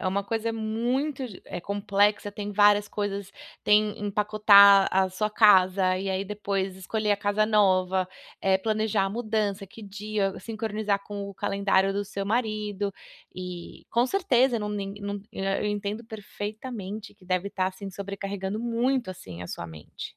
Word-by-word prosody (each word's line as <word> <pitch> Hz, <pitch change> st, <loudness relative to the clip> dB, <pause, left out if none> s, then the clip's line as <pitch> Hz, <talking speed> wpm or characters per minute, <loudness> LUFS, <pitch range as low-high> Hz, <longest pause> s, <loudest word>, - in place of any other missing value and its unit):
é -, -, -2 dB
uma 195 Hz, +2 st, 0 dB
coisa 225 Hz, +2 st, -2 dB
muito 245 Hz, +5 st, -1 dB
j 195 Hz, -, -12 dB
eh, -, -, -6 dB
complexa. 205 Hz, +1 st, +1 dB
Tem 205 Hz, 0 st, -5 dB
várias 205 Hz, 0 st, +5 dB
coisas, 200 Hz, -1 st, -4 dB, 0.3 s
tem 210 Hz, +1 st, +3 dB
empacotar 200 Hz, -1 st, +6 dB
a 190 Hz, 0 st, +3 dB
sua 190 Hz, +3 st, -1 dB
casa 190 Hz, -3 st, +5 dB
e 195 Hz, +1 st, -3 dB
aí 190 Hz, +1 st, -1 dB
depois 200 Hz, -2 st, -3 dB
escolher 210 Hz, +3 st, -2 dB
a -, -, +1 dB
casa 205 Hz, +1 st, +1 dB
nova, 190 Hz, -3 st, +3 dB, 0.3 s
eh, 190 Hz, 0 st, +3 dB
planejar 215 Hz, 0 st, 0 dB
a 195 Hz, -, -2 dB
mudança, 215 Hz, -3 st, -1 dB
que 220 Hz, +4 st, -13 dB
dia, 205 Hz, -1 st, -3 dB
sincronizar 215 Hz, -2 st, -2 dB
com 200 Hz, -1 st, -6 dB
o 200 Hz, -, -9 dB
calendário 195 Hz, -1 st, +1 dB
do 200 Hz, +1 st, -2 dB
seu 200 Hz, 0 st, -5 dB
marido, 210 Hz, -3 st, -1 dB, 0.4 s
e 180 Hz, -1 st, -8 dB
com 240 Hz, +2 st, +3 dB
certeza 260 Hz, -9 st, +2 dB
não 210 Hz, -1 st, -3 dB
nem 200 Hz, -1 st, -4 dB
não 200 Hz, 0 st, -4 dB
eh, 195 Hz, 0 st, -1 dB
eu -, -, -1 dB
entendo 205 Hz, +2 st, -3 dB
perfeitamente 215 Hz, -1 st, -7 dB
que 200 Hz, -3 st, -22 dB
deve 185 Hz, +1 st, -1 dB
estar, 190 Hz, -2 st, -1 dB
assim, 190 Hz, +1 st, -6 dB
sobrecarregando 200 Hz, +1 st, -5 dB
muito, 240 Hz, 0 st, 0 dB
assim, 90 Hz, -, -9 dB
a -, -, -6 dB
sua 85 Hz, -, -6 dB
mente. 80 Hz, -2 st, -10 dB
205 Hz, 165 wpm, -26 LUFS, 195-215 Hz, 0.4 s, empacotar